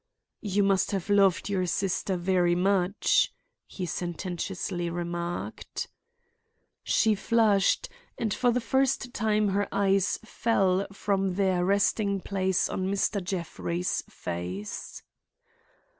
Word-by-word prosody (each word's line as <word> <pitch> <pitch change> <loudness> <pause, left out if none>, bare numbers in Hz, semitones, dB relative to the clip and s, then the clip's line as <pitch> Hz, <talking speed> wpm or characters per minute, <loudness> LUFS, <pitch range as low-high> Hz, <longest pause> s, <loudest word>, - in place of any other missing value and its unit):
"You 205 -2 +1
must 195 -1 +2
have 195 +1 -2
loved 195 -3 +4
your 190 -3 0
sister 190 +1 -1
very 175 -1 +2
much," 190 +1 +2 0.4
he 185 - -5
sententiously 175 +1 -3
remarked. 175 0 -4 0.9
She 220 -1 +3
flushed 215 - +2 0.3
and 220 -4 -1
for 245 - +2
the 245 +1 +2
first 265 0 +1
time 215 -2 +1
her 200 +1 0
eyes 195 -1 +2
fell 195 -4 +1
from 195 -1 -1
their 190 -2 +2
resting 200 +1 +2
place 190 -1 0
on 185 - -2
Mr. 200 0 0
Jeffrey's 175 -1 -2
face. 90 +4 -6
195 Hz, 110 wpm, -28 LUFS, 180-200 Hz, 0.9 s, loved